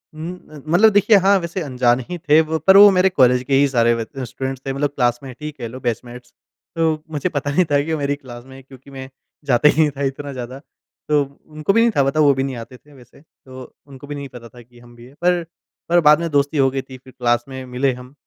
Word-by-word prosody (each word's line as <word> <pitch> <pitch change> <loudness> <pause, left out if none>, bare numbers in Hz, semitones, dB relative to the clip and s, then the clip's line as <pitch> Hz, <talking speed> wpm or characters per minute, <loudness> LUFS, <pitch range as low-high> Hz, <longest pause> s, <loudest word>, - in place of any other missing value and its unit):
उम 160 +3 -6 0.2
अ, 150 -2 -11
मतलब 180 +7 +5
देखिए 205 +1 +5
हाँ 200 0 +5
वैसे 170 +1 -5
अनजान 125 -3 +1
ही 180 - -4
थे 155 -1 +3
वो, 160 0 -2
पर 190 +5 +5
वो 205 +1 +9
मेरे 185 0 +3
कॉलेज 125 -6 +3
के 135 - -3
ही 140 - +4
सारे 120 -3 +2
ब 115 -1 -4 0.2
स्टूडेंट्स 130 +1 -6
थे। 135 - -3
मतलब 145 +2 -1
क्लासमेट 125 0 -2
ही 150 0 -5
कह 125 -6 -8
लो 125 +3 -9
बैचमेट्स, 120 0 -6 0.4
तो 160 -2 0
मुझे 150 +4 -2
पता 145 -3 -3
नहीं 180 +5 +2
था 145 - +3
कि 160 - -5
वो - - -1
मेरी 140 0 -1
क्लास 120 -4 -12
में 130 0 -14
हैं। 135 - -13
क्योंकि 135 +1 -17
मैं 130 -1 -9 0.4
जाता 135 +2 +3
ही 160 - +2
नहीं 150 - +2
था 140 - -3
इतना 140 +1 -4
ज़्यादा। 125 +1 -7 0.5
तो 150 -1 +3 0.3
उनको 155 +4 -2
भी 230 - +4
नहीं 235 - +3
था 140 - +3
पता 135 +3 -1
वो 145 -2 +5
भी 135 0 -2
नहीं 135 -2 -4
आते 120 +2 -10
थे 145 +5 -23
वैसे। 125 +1 -19
तो 130 -4 -15 0.3
उनको 135 0 -13
भी 145 - -6
नहीं 140 -1 -7
पता 120 -1 -11
था 120 +1 -15
कि 120 +1 -20
हम 120 0 -17
भी 120 0 -15
हैं। 130 - -18
पर 175 -1 +1 0.5
पर 175 0 +4
बाद 150 -1 +5
में 170 0 -3
दोस्ती 145 +1 0
हो 135 -1 +3
गई 135 0 -3
थी 130 0 -13
फिर 130 0 -18
क्लास 120 -1 +1
में 130 0 -7
मिले 130 +2 -1
हम, 125 +1 -12
135 Hz, 265 wpm, -19 LUFS, 125-155 Hz, 0.5 s, वो